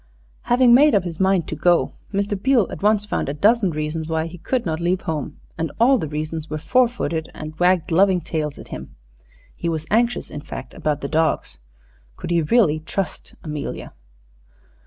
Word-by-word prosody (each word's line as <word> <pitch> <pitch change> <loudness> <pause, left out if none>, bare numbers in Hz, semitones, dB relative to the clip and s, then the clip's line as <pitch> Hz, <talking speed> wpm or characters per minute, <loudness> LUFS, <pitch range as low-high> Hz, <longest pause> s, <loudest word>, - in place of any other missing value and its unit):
Having 245 0 +5
made 290 +2 +6
up 200 - +3
his 170 -3 -6
mind 190 -3 +2
to - - -4
go, 175 -1 +2 0.2
Mr. 200 0 -1
Beale 240 +2 +3
at - - -7
once 210 0 +3
found 210 - -2
a 140 - -3
dozen 210 +4 +3
reasons 155 0 -3
why 160 0 0
he 165 +1 -9
could 250 +7 -1
not 160 -2 -2
leave 175 +2 0
home, 155 -1 -4 0.2
and 165 -2 -1
all 255 +2 +5
the 160 - -3
reasons 155 +1 -4
were 155 - -3
four 250 +11 +3
footed, 165 -9 -3
and 155 +1 -8
wagged 180 -1 +2
loving 185 +2 +4
tails 155 -4 -3
at - - -11
him. 65 - -8 0.6
He 170 - -3
was 160 -1 -3
anxious, 235 +3 +1
in 145 - -6
fact, 150 - -8
about 150 -1 -2
the 140 - -3
dogs. 160 +2 0 0.6
Could - - -6
he 170 -1 +3
really 155 -3 +3
trust 180 +4 -5
Amelia? 150 -3 -5
170 Hz, 190 wpm, -22 LUFS, 155-205 Hz, 0.6 s, made